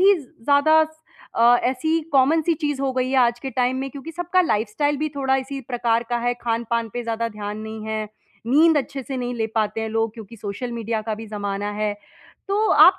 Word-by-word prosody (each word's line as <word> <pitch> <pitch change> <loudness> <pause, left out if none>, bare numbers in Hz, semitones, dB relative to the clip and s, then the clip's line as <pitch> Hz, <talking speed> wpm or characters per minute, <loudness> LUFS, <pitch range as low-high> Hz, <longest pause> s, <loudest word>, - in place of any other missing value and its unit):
ही 395 +2 +7
ज़् 290 - -11 0.2
ज़्यादा 300 +3 +5
स 315 0 -15 0.4
अ, 240 +1 +6
ऐसी 315 +6 +1
कॉमन 280 +4 +5
सी 335 - +2
चीज़ 290 -3 -1
हो 270 -1 0
गई 255 0 0
है 270 - +1
आज 240 -1 +3
के 270 - -4
टाइम 255 0 +1
में 270 +1 -2
क्योंकि 280 +4 -8
सबका 355 +2 +1
लाइफ़स्टाइल 285 +2 0
भी 310 +1 0
थोड़ा 265 -1 +1
इसी 270 +1 -4
प्रकार 240 -2 0
का 240 - +2
है। 240 +1 +1
खान-पान 235 -1 -1
पे 245 - -3
ज़्यादा 230 0 -1
ध्यान 210 -1 -6
नहीं 220 0 -7
है। 220 0 -2 0.4
नींद 310 +6 +5
अच्छे 275 -1 -2
से 265 +1 -5
नहीं 245 -1 -2
ले 225 -2 -1
पाते 215 0 0
हैं 220 - -2
लोग 225 0 0
क्योंकि 225 0 -10
सोशल 205 +4 -5
मीडिया 230 -1 -2
का 220 0 -2
भी 225 +1 -8
ज़माना 205 -1 -3
है। 210 0 -1 0.6
तो 420 +2 +2
आप - - +7
245 Hz, 220 wpm, -23 LUFS, 225-280 Hz, 0.6 s, ही